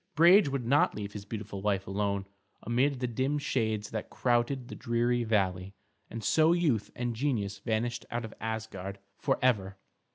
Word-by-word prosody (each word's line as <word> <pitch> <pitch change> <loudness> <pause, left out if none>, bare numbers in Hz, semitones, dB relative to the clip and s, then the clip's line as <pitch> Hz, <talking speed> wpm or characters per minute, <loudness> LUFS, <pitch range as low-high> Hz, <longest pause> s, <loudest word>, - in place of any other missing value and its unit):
Brage 175 +1 +7
would 135 -3 -2
not 140 +5 +3
leave 105 -1 -5
his 100 -1 -7
beautiful 105 -2 -6
wife 100 -1 0
alone 100 0 -1 0.4
amid 130 +3 +1
the - - +1
dim 130 +5 0
shades 110 -7 -1
that 110 -1 -4
crowded 120 +1 0
the - - -8
dreary 120 +1 0
valley, 95 -3 0 0.3
and 115 -1 -6
so 160 +7 +4
youth 150 - +1
and 120 -1 -2
genius 110 -7 -1
vanished 115 +2 -2
out 120 0 -3
of 110 - -9
Asgard 110 -4 -4 0.2
forever. 115 -8 +1
115 Hz, 160 wpm, -30 LUFS, 100-130 Hz, 0.4 s, Brage